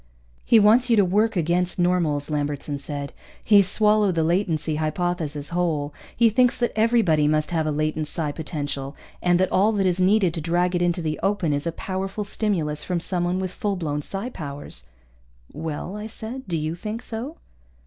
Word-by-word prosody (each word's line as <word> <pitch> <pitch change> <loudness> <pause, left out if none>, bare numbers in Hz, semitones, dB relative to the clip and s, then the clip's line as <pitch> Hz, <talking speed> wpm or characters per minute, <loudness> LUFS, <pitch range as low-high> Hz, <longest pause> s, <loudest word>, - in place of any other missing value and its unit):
"He 230 - +5
wants 230 +5 +5
you 230 - +5
to 205 -3 +4
work 210 +5 +2
against 175 +1 0
normals," 175 -5 +1
Lambertson 145 -1 -2
said. 140 0 -5 0.3
"He's 200 -3 +5
swallowed 210 -2 +3
the 165 - +2
latency 165 -3 0
hypothesis 155 -2 -2
whole. 160 -4 -1 0.2
He 230 -1 +5
thinks 250 +2 +3
that 240 - 0
everybody 215 -10 +3
must 155 +1 +1
have 160 -2 0
a - - +1
latent 155 +1 -1
psi 155 -1 -2
potential, 145 -3 -4 0.3
and 175 0 +3
that 185 - +1
all 205 +4 +4
that 200 -2 +1
is 185 0 +1
needed 185 -2 +3
to 165 - -4
drag 175 +3 +1
it 175 - 0
into 175 -1 0
the 155 -1 -2
open 195 -6 +1
is 145 +3 -1
a - - 0
powerful 190 +4 -4
stimulus 170 -8 -1
from 180 -2 -1
someone 175 +1 -1
with 185 -1 -3
full 205 0 -2
blown 150 -5 -2
psi 195 - -4
powers." 140 - -8 0.7
"Well?" 160 +5 -5
I 210 +1 -5
said. 225 +3 -7
"Do 170 -3 -1
you 155 +1 -2
think 215 +7 -5
so?" 245 +8 -6
175 Hz, 185 wpm, -24 LUFS, 155-205 Hz, 0.7 s, He